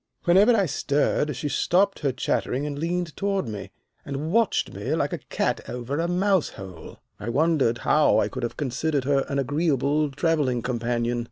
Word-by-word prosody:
Whenever 200 +7 +5
I 200 -3 +3
stirred 145 -1 0
she 150 - -3
stopped 195 +7 +2
her 140 -3 0
chattering 130 +1 -1
and 145 -1 -4
leaned 170 0 -2
toward 195 -6 -1
me, 105 -3 -6 0.3
and 145 +3 -4
watched 230 0 +1
me - - -2
like - - -1
a - - -3
cat - - -2
over 125 +4 -3
a 170 - 0
mouse 185 0 +2
hole. 90 -4 -10 0.2
I 110 - -5
wondered 140 -3 +2
how 150 +4 +3
I - - +2
could 130 - -6
have 120 - -4
considered 145 +1 -1
her 135 0 +1
an 140 - -1
agreeable 145 +1 +1
travelling 140 -5 0
companion. 120 -1 -1
145 Hz, 175 wpm, -25 LUFS, 125-170 Hz, 0.3 s, Whenever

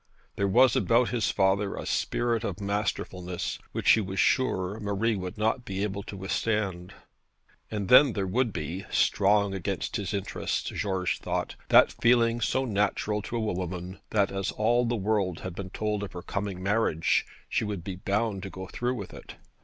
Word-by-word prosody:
There 100 - +1
was 125 +6 +5
about 120 +1 +3
his 120 -4 0
father 95 +1 +1
a - - -6
spirit 120 -1 0
of 100 -4 -3
masterfulness, 100 -3 -3
which - - +3
he 110 - +5
was 95 -1 -4
sure 105 -6 +1
Marie 105 +2 0
would 90 0 -5
not 110 +4 0
be 95 -3 -3
able 100 -1 -2
to 100 - -8
withstand. 95 -2 -2 0.7
And 105 -3 -3
then 130 +3 +7
there 100 -2 -1
would 115 +5 +1
be 85 +4 -5
strong 100 0 +3
against 95 0 -2
his 100 -3 -3
interests, 100 -3 -2
George 95 -3 -1
thought 90 0 -3
that - - +7
feeling 120 -1 +3
so 130 +5 +1
natural 105 -1 0
to 115 - -6
a - - 0
woman, 90 -3 -3
that 105 -2 +2
as 95 0 -2
all 120 +3 +2
the 120 - 0
world 100 -4 0
had 95 - -5
been 95 +1 -6
told 105 +1 -2
of 100 -2 -6
her 90 -1 -7
coming 100 -2 -4
marriage, 100 -5 +2 0.2
she - - 0
would 105 -5 -4
be 95 0 -5
bound 100 +1 -1
to 95 - -6
go 95 0 -7
through 120 +6 -2
with 100 -6 -7
it. - - -11
100 Hz, 180 wpm, -28 LUFS, 95-110 Hz, 0.7 s, then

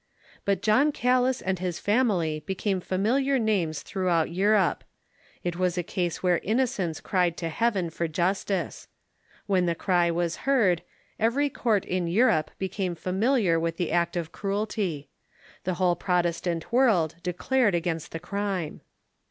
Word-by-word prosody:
But 200 -1 0
John 255 +8 +4
Calas 255 0 +1
and 190 -1 -1
his 180 -2 -2
family 195 -9 +1
became 190 0 -1
familiar 255 +10 +1
names 195 - 0
through 185 -2 -2
out 165 -2 +2
Europe. 195 -1 +2 0.6
It 175 -1 -2
was 180 -1 0
a 175 - 0
case 175 -1 -3
where 180 -2 +3
innocence 215 -7 -1
cried 180 -3 0
to 165 - -3
Heaven 190 -2 0
for 170 +1 -2
justice. 185 +2 -1 0.6
When 185 -3 +2
the 170 - +1
cry 175 -1 +2
was 170 0 -1
heard, 220 -11 +2 0.4
every 275 +6 +2
court 220 -7 +1
in 180 -2 -1
Europe 175 -4 +3
became 190 -1 -2
familiar 190 0 +1
with 165 0 -2
the 175 -3 -1
act 170 +1 +1
of 170 -1 -3
cruelty. 195 -7 -2 0.6
The 185 -1 0
whole 180 -1 +2
Protestant 175 -1 -1
woi'ld 190 - +2
declared 200 +5 +1
against 165 -2 -2
the 165 - -5
crime. 195 -2 -3
185 Hz, 145 wpm, -26 LUFS, 170-215 Hz, 0.6 s, John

